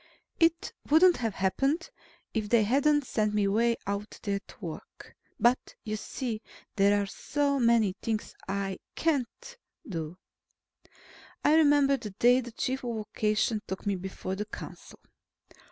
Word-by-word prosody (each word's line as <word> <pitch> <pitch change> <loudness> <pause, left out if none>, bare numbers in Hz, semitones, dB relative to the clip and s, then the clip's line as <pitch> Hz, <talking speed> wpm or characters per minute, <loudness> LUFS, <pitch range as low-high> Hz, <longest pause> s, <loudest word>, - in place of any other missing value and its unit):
It 330 0 +2 0.2
wouldn't 340 +4 +6
have 225 -4 -2
happened, 275 - 0 0.4
if 215 -2 -2
they 235 -1 +5
hadn't 285 +5 +3
sent 215 -3 0
me 205 -1 +2
way 230 +3 +2
out 200 +1 -4
there 200 -2 0
to - - -16
work. 170 -6 -9 0.2
But, 240 +2 +2
you 215 -2 -3
see, 220 +1 -4 0.3
there 205 0 +4
are 200 - 0
so 280 +7 -1
many 230 -5 +4
things 220 -2 -2
I 195 -1 -2 0.2
can't 330 - -2 0.3
do. 165 -3 -5 1.3
I 295 - +6
remember 290 -3 +5
the 215 - -7
day 245 +3 +5
the 240 -1 -8
Chief 260 +3 -2
of 240 -2 -2
Vocation 215 0 0
took 190 +2 -5
me 200 -1 +1
before 190 0 -5
the 210 +2 -3
council. 215 - -10
225 Hz, 145 wpm, -29 LUFS, 200-275 Hz, 1.3 s, wouldn't